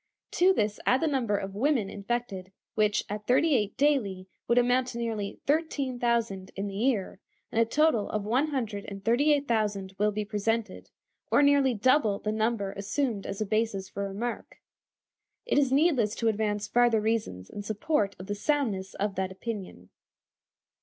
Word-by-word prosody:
To 365 +2 +4
this 210 - 0
add 255 - +4
the 325 - 0
number 255 -9 +1
of 195 0 -5
women 245 0 +1
infected, 200 -3 -4 0.2
which, 210 -1 +2
at 210 +1 -6
thirty 300 +5 +4
eight 210 -4 -1
daily, 215 -11 +1 0.2
would 235 - +2
amount 245 +1 +3
to 250 -2 -6
nearly 220 -4 -3
thirteen 280 -4 0
thousand 230 -6 0
in 195 - -3
the 200 - -5
year, 210 -4 0 0.3
and 230 - +2
a - - +4
total 290 -4 +2
of 210 -1 -2
one 255 +8 +2
hundred 225 -8 -3
and 195 -1 -8
thirty 255 +7 +3
eight 285 -1 +2
thousand 205 -4 -1
will 210 +1 +3
be 210 0 -3
presented, 215 0 -2 0.4
or 290 - +5
nearly 280 -3 +4
double 220 -2 +3
the 215 - -3
number 215 -2 0
assumed 205 +2 -2
as 200 - -5
a - - +1
basis 215 -2 -1
for 200 0 -4
remark. 230 +5 -5 0.9
It 475 - +2
is 275 -3 +2
needless 270 -7 +3
to 230 - +1
advance 210 -1 -1
farther 240 0 +3
reasons 210 - -2
in 205 - -6
support 205 0 -1
of 185 - -9
the 205 - -3
soundness 205 -6 -1
of 205 0 -1
that 190 0 -1
opinion. 190 - -7
220 Hz, 175 wpm, -28 LUFS, 200-255 Hz, 0.9 s, or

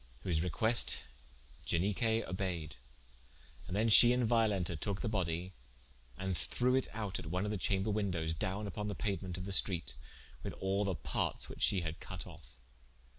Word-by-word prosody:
Whose 85 -5 0
request 110 +7 +4 0.7
Ianique 110 +6 0
obeied: 90 -5 -4 0.9
and 90 - -4
then 110 +3 +2
she 120 +2 +9
and 125 -2 +1
Violenta 105 -7 +1
toke 100 +6 -3
the - - -2
body, 90 -3 -2 0.6
and 95 -1 -2
threwe 125 +7 +1
it 130 - +1
out 105 -3 -3
at - - -8
one 90 +5 -1
of 105 - -2
the 105 - -2
chamber 95 +3 0
wyndowes 90 -6 -1
down 95 +6 -3
vpon 105 -1 -4
the 105 - -3
pauement 95 -4 -3
of 90 - -6
the 100 - -5
streate, 90 -7 +2 0.5
with - - -5
all 100 +2 -1
the 95 -2 -1
partes 70 - -2
which - - -10
she 95 - +3
had 80 -1 -5
cut - - -7
of. - - -12
95 Hz, 175 wpm, -34 LUFS, 90-105 Hz, 0.9 s, she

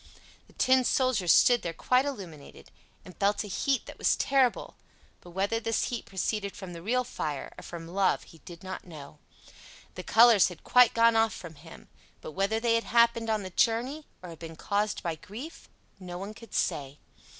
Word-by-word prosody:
The - - -22
Tin 260 0 +3
Soldier 250 -7 +1
stood 240 +7 +5
there 170 - -4
quite 255 +8 +2
illuminated, 175 - -8 0.3
and 180 - -12
felt 205 +2 +1
a - - -8
heat 265 +6 -1
that - - -11
was - - +3
terrible; 265 -3 +1 0.4
but 175 - -15
whether 195 +5 -1
this 225 -1 -1
heat 240 -2 -5
proceeded 200 +1 -3
from 190 -5 -8
the 170 - -9
real 250 +7 0
fire 150 - -5
or - - -11
from 165 -1 -9
love 190 +2 +1
he 165 - -17
did 170 +4 -12
not 190 0 -6
know. 150 -3 -11 0.7
The - - -7
colors 225 -3 +6
had 180 -3 -10
quite 250 -2 +5
gone 230 0 +5
off 225 0 +3
from 170 -2 -9
him; 160 +2 -14 0.3
but - - -9
whether 200 +6 0
that 235 - -3
had 230 0 +1
happened 235 -1 +3
on 215 -2 0
the 185 - -7
journey, 245 - 0 0.2
or 180 - -8
had 165 - -12
been 165 -1 -9
caused 205 +4 -2
by 170 -2 -1
grief, 230 - -10 0.3
no 180 -2 -7
one 200 +3 -7
could 230 +1 -12
say. 140 0 -1
205 Hz, 195 wpm, -28 LUFS, 175-235 Hz, 0.7 s, colors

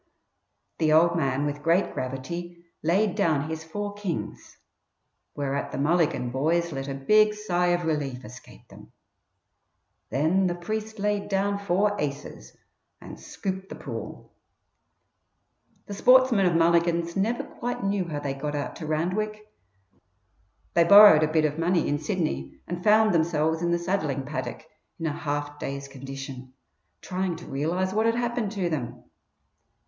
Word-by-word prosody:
The 155 -2 +2
"old 170 +2 +5
man" 140 -3 0
with 145 0 -3
great 170 +5 +2
gravity 170 +7 -6 0.2
laid 185 +5 +2
down 155 -4 +1
his 160 0 -5
four 205 +6 -5
kings, 200 -5 -5 0.8
whereat 140 -1 -2
the - - -5
Mulligan 145 -4 +1
boys 165 +6 0
let 135 -1 -5
a 135 - -4
big 210 +10 +4
sigh 180 -4 0
of 175 -1 +1
relief 140 -5 -2
escape 125 +4 -13
them. - - -15 1.2
Then 165 +7 +2
the 175 - -1
priest 215 +5 -5
laid 205 0 -1
down 200 +1 0
four 200 +1 +1
aces 140 - -6 0.4
and - - -11
scooped 190 0 -5
the - - -7
pool. - - -8 1.5
The 205 - -7
sportsmen 250 -3 +5
of 175 - +1
Mulligan's 170 0 +2
never 220 +5 0
quite 245 -3 -5
knew 195 -1 0
how 150 -4 -4
they 140 -2 -2
got 145 +2 -4
out 145 - -4
to 155 - -7
Randwick. 210 +7 -2 1.2
They 170 - +5
borrowed 200 -3 +9
a 155 0 +1
bit 155 -1 +3
of 150 +1 -2
money 170 0 +1
in 145 - 0
Sydney, 155 - -3
and 175 0 -5
found 215 0 +5
themselves 160 -1 +1
in 175 - 0
the 170 - +2
saddling 170 -6 -1
paddock 130 0 -5 0.3
in 165 - -4
a 160 - 0
half 145 0 -4
dazed 140 0 -5
condition, 135 -1 -8 0.5
trying 185 -1 -2
to 170 - -11
realize 170 +7 -1
what 220 +2 +2
had 230 - +2
happened 240 -3 -1
to 190 -4 -1
them. 125 -7 -4
170 Hz, 150 wpm, -26 LUFS, 145-195 Hz, 1.5 s, borrowed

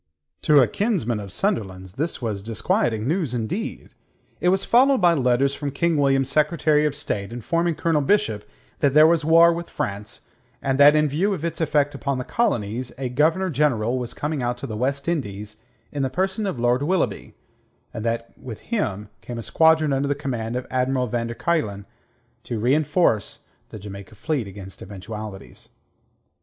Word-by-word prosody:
To 150 -2 +5
a - - +2
kinsman 160 - -1
of 100 -2 -7
Sunderland's 95 - -2
this 150 +2 -3
was 105 -4 -2
disquieting 110 +1 -1
news, 155 -5 -1
indeed. 120 - -4 0.5
It 180 - +2
was 190 +1 +2
followed 265 +3 +4
by 175 -3 +5
letters 135 -1 +2
from 145 0 -4
King 170 +4 0
William's 135 -2 +2
Secretary 150 +1 +2
of 145 - -3
State 105 -8 -3
informing 165 +8 -1
Colonel 165 -3 +1
Bishop 115 - +1 0.4
that 140 -1 +2
there 155 +1 +8
was 165 -1 +3
war 165 +2 +6
with 170 0 -6
France, 100 +1 -5 0.3
and 135 +1 -1
that 145 +1 +8
in 150 0 +3
view 185 +8 0
of 165 - -5
its 170 - -3
effect 145 -2 +1
upon 140 -2 -2
the 125 - -3
Colonies 120 - -1
a 130 -1 -3
Governor 160 +8 +1
General 130 -5 +1
was 120 -2 -5
coming 150 -1 -2
out 120 0 -1
to 130 - -6
the 110 - -5
West 140 +5 -2
Indies 105 - -3 0.3
in 145 - -3
the 135 - 0
person 190 +7 -1
of 185 - -3
Lord 120 +2 +2
Willoughby, 180 +5 -1 0.6
and 110 - -5
that 115 0 -2
with 115 -5 -9
him 105 - -2
came 120 - -7
a 115 - -5
squadron 160 0 +3
under 135 +1 0
the 145 - 0
command 120 -5 -4
of 125 - -3
Admiral 130 0 +1
van 115 0 -2
der 115 - -6
Kuylen 115 -8 -1 0.6
to 120 - -3
reenforce 130 - +1 0.2
the - - -8
Jamaica 100 +1 -10
fleet 130 0 -2
against 95 -1 -10
eventualities. 105 +1 -9
135 Hz, 175 wpm, -23 LUFS, 115-160 Hz, 0.6 s, there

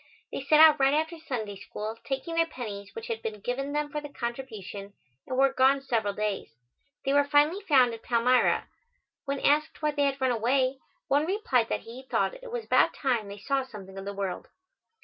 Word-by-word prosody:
They - - -4
set 300 +3 +4
out 310 -1 +8
right 270 +1 +4
after 320 +2 -1
Sunday 220 -10 -4
School, 215 +2 -6
taking 270 +5 -3
their 330 0 +2
pennies 205 -9 -7
which 225 - -6
had 225 -1 -4
been 220 -2 -5
given 265 +6 -3
them 295 0 -2
for 300 - -3
the 290 - -8
contribution, 220 -6 -6 0.3
and 255 - -3
were 270 0 +4
gone 270 +2 +4
several 220 -6 -1
days. 210 -2 -2 0.6
They 270 - +2
were 285 0 +5
finally 295 +6 +3
found 265 - +4
at 225 - -8
Palmyra. 245 +1 +2 0.6
When 275 -1 -2
asked 305 +2 +1
why 300 - +2
they 290 -1 +1
had 275 0 0
run 260 -1 +2
away, 255 +3 +1 0.3
one 290 +3 +2
replied 305 - +1
that - - -1
he 235 +3 -10
thought 265 - 0
it - - -10
was 480 -2 -4
about - - +3
time 240 -6 0
they 200 0 -8
saw 275 +6 0
something 200 -6 -11
of 195 0 -7
the 200 - -4
world. 195 -2 -4
265 Hz, 205 wpm, -28 LUFS, 225-290 Hz, 0.6 s, out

